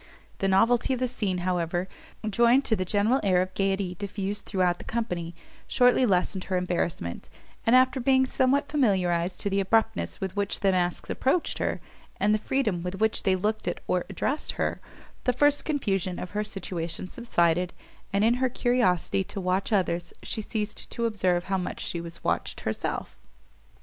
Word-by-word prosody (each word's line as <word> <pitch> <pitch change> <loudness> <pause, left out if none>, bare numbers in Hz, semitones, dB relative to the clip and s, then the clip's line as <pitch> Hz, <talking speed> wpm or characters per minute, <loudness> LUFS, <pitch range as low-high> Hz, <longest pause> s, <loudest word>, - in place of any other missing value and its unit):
The 195 - +1
novelty 230 +7 +3
of 255 - -2
the 255 - +1
scene, 205 -6 -1
however, 175 0 0 0.4
joined 235 +5 +4
to 220 - +2
the 185 - -1
general 210 +7 +2
air 185 -3 +3
of 185 +1 -1
gaiety 195 -1 0
diffused 200 +1 -3
throughout 180 -3 +1
the - - -8
company, 175 -8 -3 0.3
shortly 250 0 +4
lessened 185 -1 +1
her 185 0 0
embarrassment; 175 - -2 0.4
and, 235 - +6
after 260 +1 +4
being 260 +1 +4
somewhat 260 +3 +2
familiarized 185 - +1
to 200 - 0
the 195 - +2
abruptness 195 - +1
with 190 0 -4
which 200 -1 -1
the 195 - +4
masks 180 -1 -1
approached 290 +6 0
her, - - -1 0.4
and 205 +2 +3
the 215 - +2
freedom 215 -7 0
with 180 +2 -4
which 220 +2 +1
they 190 -2 +2
looked 210 +4 -1
at - - -1
or 180 -1 0
addressed 265 - -2
her, - - -2 0.4
the 250 - +3
first 290 +3 +3
confusion 195 - -1
of 180 - -6
her 210 +1 -1
situation 180 -4 -4
subsided, 180 -6 +1 0.4
and 200 +1 +2
in 230 +2 +5
her 260 - +3
curiosity 240 -8 +1
to 200 - -6
watch 185 +3 0
others, 175 -4 0
she 220 - -3
ceased 210 0 -4
to 235 - -2
observe 185 -6 +1
how 190 0 -1
much 180 - -4
she 170 - -3
was 170 0 -8
watched 85 0 -1
herself. - - -3
195 Hz, 175 wpm, -27 LUFS, 180-235 Hz, 0.4 s, and